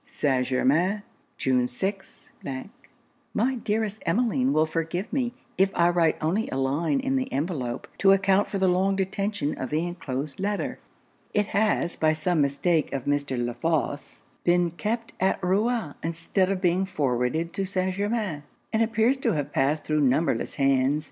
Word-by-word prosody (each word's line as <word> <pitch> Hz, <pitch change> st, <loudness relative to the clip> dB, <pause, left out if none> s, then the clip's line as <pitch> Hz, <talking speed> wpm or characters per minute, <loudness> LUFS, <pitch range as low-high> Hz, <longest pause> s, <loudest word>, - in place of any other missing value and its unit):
St. 135 Hz, -, 0 dB
Germains, 165 Hz, +11 st, +2 dB, 0.3 s
June 125 Hz, -2 st, +2 dB
6. 195 Hz, +10 st, -5 dB, 1.0 s
'My 260 Hz, +2 st, +2 dB
dearest 215 Hz, 0 st, -1 dB
Emmeline 245 Hz, +8 st, +1 dB
will 155 Hz, -, +3 dB
forgive 165 Hz, +6 st, -3 dB
me 255 Hz, -3 st, 0 dB, 0.3 s
if 190 Hz, 0 st, +5 dB
I 170 Hz, 0 st, +4 dB
write 170 Hz, -2 st, +3 dB
only 185 Hz, +9 st, 0 dB
a -, -, -3 dB
line 145 Hz, -, +1 dB
in 270 Hz, 0 st, 0 dB
the 260 Hz, -, -2 dB
envelope, 135 Hz, -5 st, -2 dB
to 195 Hz, -, +6 dB
account 195 Hz, +1 st, +3 dB
for 200 Hz, -, -2 dB
the 190 Hz, -1 st, +2 dB
long 190 Hz, +2 st, +2 dB
detention 195 Hz, -4 st, -1 dB
of 130 Hz, -, -3 dB
the 155 Hz, +3 st, 0 dB
enclosed 145 Hz, -5 st, -4 dB
letter. 205 Hz, +1 st, -2 dB, 0.6 s
It 210 Hz, 0 st, +3 dB
has, 205 Hz, -4 st, +1 dB
by 155 Hz, 0 st, +3 dB
some 155 Hz, +1 st, +1 dB
mistake 150 Hz, +3 st, +1 dB
of 135 Hz, -2 st, -3 dB
Mr. 145 Hz, -2 st, 0 dB
La 120 Hz, -, -3 dB
Fosse, 145 Hz, +2 st, -2 dB, 0.2 s
been 175 Hz, -1 st, +3 dB
kept 220 Hz, +8 st, -3 dB
at 190 Hz, +1 st, +2 dB
Rouen 200 Hz, -2 st, +1 dB
instead 170 Hz, +3 st, 0 dB
of 195 Hz, -2 st, -1 dB
being 185 Hz, +1 st, +2 dB
forwarded 145 Hz, +1 st, 0 dB
to 195 Hz, -, -1 dB
St. 185 Hz, 0 st, -1 dB
Germains; 205 Hz, -5 st, -1 dB, 0.3 s
and 220 Hz, -, +2 dB
appears 225 Hz, +3 st, +2 dB
to 265 Hz, -, 0 dB
have 145 Hz, -2 st, -3 dB
passed 145 Hz, +3 st, +1 dB
thro' 155 Hz, 0 st, +1 dB
numberless 140 Hz, +3 st, +1 dB
hands. 135 Hz, +1 st, +2 dB
175 Hz, 160 wpm, -26 LUFS, 145-200 Hz, 1.0 s, to